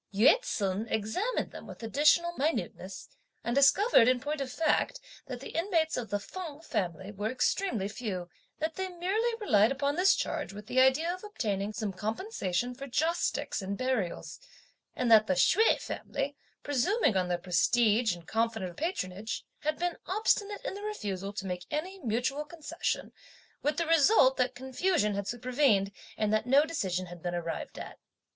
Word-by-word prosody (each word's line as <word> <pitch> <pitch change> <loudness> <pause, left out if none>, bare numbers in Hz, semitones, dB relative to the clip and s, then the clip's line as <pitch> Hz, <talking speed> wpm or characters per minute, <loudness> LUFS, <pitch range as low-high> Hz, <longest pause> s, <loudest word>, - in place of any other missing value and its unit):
Yü 220 - +6
ts'un 205 - -2
examined 220 - -1
them - - -10
with - - -10
additional 300 +8 +3
minuteness, 305 +3 -3 0.4
and 235 - -1
discovered 280 - +6
in 255 0 +4
point 290 +2 -3
of 260 -2 -3
fact, 325 - +1 0.3
that 250 -2 -6
the - - -7
inmates 330 -2 +1
of 240 -3 -4
the 205 - 0
Feng 315 - -7
family 190 - -3
were 205 +1 -3
extremely 255 - 0
few, 200 -5 -4 0.3
that 315 +1 -2
they 380 0 -2
merely 385 +7 0
relied 215 - +4
upon 280 +1 0
this 370 +3 +5
charge 305 -10 -3
with 210 +1 -9
the 250 +3 +3
idea 295 +7 +3
of 370 - -9
obtaining 210 - -2
some 215 -2 -3
compensation 220 - -2
for 275 +2 -8
joss 320 +6 +1
sticks - - -1
and 195 +1 -4
burials; 255 -8 -2 0.6
and 245 -2 0
that 215 -1 +7
the 185 - +2
Hsüeh 410 - +4
family, 285 +1 -4 0.3
presuming 290 - +2
on 185 -1 +1
their 175 0 0
prestige 210 +4 +2
and 170 -1 -14
confident 225 -5 -1
of - - -19
patronage, 220 - -3
had 305 +1 -1
been 350 0 -1
obstinate 410 +1 +1
in - - -2
the 400 - -7
refusal 200 - -4
to 200 -1 -6
make 180 -1 -4
any 365 +6 -3
mutual 245 +5 0
concession, 320 +2 -4 0.5
with 295 +1 0
the 335 - +1
result 320 -3 +5
that 250 0 +1
confusion 265 - 0
had 200 0 -3
supervened, 240 -4 +2 0.3
and 215 0 +1
that 215 +2 +1
no 280 +4 +5
decision 190 - -2
had 175 -1 -11
been 175 0 -3
arrived 170 -1 -4
at. - - -8
255 Hz, 170 wpm, -30 LUFS, 205-325 Hz, 0.6 s, that